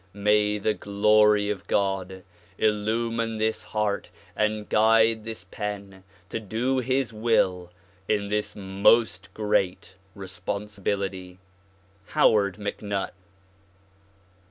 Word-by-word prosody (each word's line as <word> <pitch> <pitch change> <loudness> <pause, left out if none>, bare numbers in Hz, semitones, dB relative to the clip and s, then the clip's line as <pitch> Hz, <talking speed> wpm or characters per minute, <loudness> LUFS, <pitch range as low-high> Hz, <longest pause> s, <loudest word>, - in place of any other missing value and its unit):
May 105 +1 +2
the 105 +1 0
Glory 105 0 +3
of 100 -1 -6
God 95 -2 -1 0.3
illumine 115 +2 0
this 110 +1 0
heart 105 -1 -2 0.3
and 105 0 0
guide 110 0 +3
this 110 -5 -6
pen 100 0 -6 0.3
to - - -3
do 115 +5 -1
his 130 -1 0
will 95 -5 +1 0.4
in 100 -1 0
this 105 0 -2
most 100 0 +2
great 100 -4 0 0.2
respon 95 +1 -5
sibility. 95 -3 -4 0.7
How.vRD 100 -3 +3
MacNutt. 100 -1 -3
105 Hz, 100 wpm, -26 LUFS, 100-110 Hz, 0.7 s, Glory